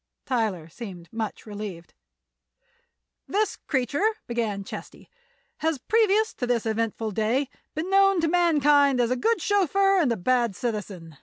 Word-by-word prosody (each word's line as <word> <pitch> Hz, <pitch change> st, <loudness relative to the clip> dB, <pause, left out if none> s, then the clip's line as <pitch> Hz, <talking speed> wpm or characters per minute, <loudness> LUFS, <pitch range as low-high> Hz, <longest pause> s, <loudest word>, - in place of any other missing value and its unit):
Tyler 215 Hz, -10 st, -1 dB
seemed 175 Hz, -1 st, -10 dB
much 220 Hz, -2 st, -4 dB
relieved. 205 Hz, -5 st, -7 dB, 1.3 s
"This 425 Hz, +2 st, 0 dB
creature," 290 Hz, -, 0 dB
began 225 Hz, -4 st, -2 dB
Chesty, -, -, -10 dB, 0.5 s
"has 320 Hz, -1 st, 0 dB
previous 435 Hz, -, +2 dB
to 245 Hz, -, -4 dB
this 240 Hz, -2 st, 0 dB
eventful 225 Hz, 0 st, -1 dB
day 230 Hz, +7 st, 0 dB, 0.3 s
been 330 Hz, +5 st, -3 dB
known 390 Hz, -1 st, +5 dB
to 325 Hz, -, +2 dB
mankind 295 Hz, -5 st, +4 dB
as 240 Hz, 0 st, +2 dB
a -, -, +2 dB
good 455 Hz, -, +1 dB
chauffeur 390 Hz, 0 st, +2 dB
and 290 Hz, -8 st, +2 dB
a 230 Hz, -, 0 dB
bad 235 Hz, +2 st, +1 dB
citizen. 195 Hz, -, -5 dB
245 Hz, 140 wpm, -25 LUFS, 215-340 Hz, 1.3 s, known